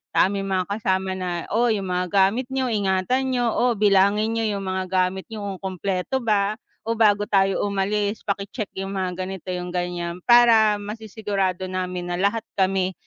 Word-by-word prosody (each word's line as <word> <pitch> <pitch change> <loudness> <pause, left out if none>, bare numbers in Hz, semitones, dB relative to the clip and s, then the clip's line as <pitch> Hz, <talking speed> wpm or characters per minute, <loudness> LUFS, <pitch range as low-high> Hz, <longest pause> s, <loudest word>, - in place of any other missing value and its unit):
sa - - 0
aming 200 0 -3
mga 185 -1 -1
kasama 190 -2 -1
na, 180 -2 -3
"Oh, 235 +3 +3
yung 195 -3 -3
mga 180 0 0
gamit 200 +7 +2
niyo 260 -1 0
ingatan 210 +6 0
niyo, 245 -1 +1
oh, 245 +2 +2
bilangin 205 +1 +3
niyo 225 - 0
yung 200 - -4
mga 185 0 -2
gamit 185 0 0
niyo 220 -2 -7 0.2
kung 190 0 -5
kumpleto 195 +8 -2
ba 210 -3 +1 0.3
o 230 - 0
bago 205 -2 +4
tayo 195 -1 +2
umalis 205 +1 -1
paki 200 -1 -2
check 215 -6 -4
yung 195 +1 -4
mga 185 -2 -2
ganito," 190 -1 -7
yung 180 -1 -4
gan'yan 175 0 -3
para 225 -2 +6
masisigurado 205 -3 -3
namin 185 -1 -3
na - - 0
lahat 210 +3 +1
kami 190 -1 +1
195 Hz, 180 wpm, -23 LUFS, 185-215 Hz, 0.3 s, para